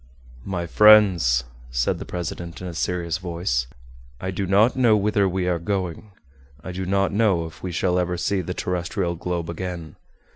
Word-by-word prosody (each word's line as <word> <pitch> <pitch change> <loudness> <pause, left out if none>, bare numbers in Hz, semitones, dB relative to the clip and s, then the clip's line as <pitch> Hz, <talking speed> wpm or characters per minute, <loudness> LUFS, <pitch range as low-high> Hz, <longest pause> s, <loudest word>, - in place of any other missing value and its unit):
"My 90 -3 -2
friends," 90 - +6 0.3
said - - 0
the - - -6
president, 85 -1 -5
in 90 - -7
a 90 - -5
serious 85 0 -2
voice, 85 -9 -2 0.5
"I 95 - -3
do 95 +1 -3
not 105 +6 +4
know 120 -4 +4
whither 100 -1 +2
we 90 0 -1
are 90 -1 +1
going; 95 +2 -3 0.5
I 95 - -6
do 95 +1 -4
not 100 +1 +1
know 100 -6 +2
if 80 - -11
we 90 - -4
shall 90 +1 +1
ever 90 0 -1
see 95 +2 0
the 90 +1 -5
terrestrial 90 0 -2
globe 85 0 -3
again. 85 -1 -6
90 Hz, 175 wpm, -23 LUFS, 85-95 Hz, 0.5 s, friends